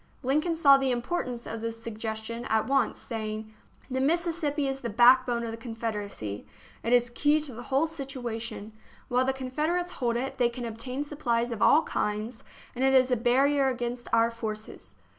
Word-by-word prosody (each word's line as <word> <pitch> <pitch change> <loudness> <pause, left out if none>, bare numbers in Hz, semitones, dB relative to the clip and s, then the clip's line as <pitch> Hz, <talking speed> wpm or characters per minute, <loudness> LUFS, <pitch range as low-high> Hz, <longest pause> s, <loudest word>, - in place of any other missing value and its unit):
Lincoln 305 +6 +1
saw 280 -4 +7
the 270 -1 0
importance 245 -1 -2
of 225 0 -5
this 230 0 -4
suggestion 225 +1 -4
at 220 -1 +1
once, 275 0 +1
saying: 220 -1 -5 0.2
" - - -26
The 260 +1 0
Mississippi 315 -1 0
is 270 0 -2
the 235 - -3
backbone 240 +1 +5
of 230 - -3
the 225 - -6
Confederacy. 210 - -5 0.3
It 230 - -2
is 245 -1 +4
the - - -19
key 295 +4 +3
to 290 -4 -4
the 235 - -8
whole 270 +5 +1
situa 270 -7 -5
tion. 220 -2 -6 0.4
While 250 +1 +2
the 265 - +2
Confederates 305 +7 -2
hold 240 -8 -1
it, 260 +3 -3
they 240 -1 +4
can 240 0 -6
ob 225 -1 -6
tain 255 +4 -3
supplies 245 -5 -1
of 225 -2 -5
all 315 - +6
kinds, 215 +3 -3 0.3
and 255 - -2
it 270 0 +4
is 255 0 +5
a - - +5
barrier 270 +4 +3
against 245 -1 -3
our 230 +1 +4
forces." 215 - -7
245 Hz, 195 wpm, -28 LUFS, 230-270 Hz, 0.4 s, saw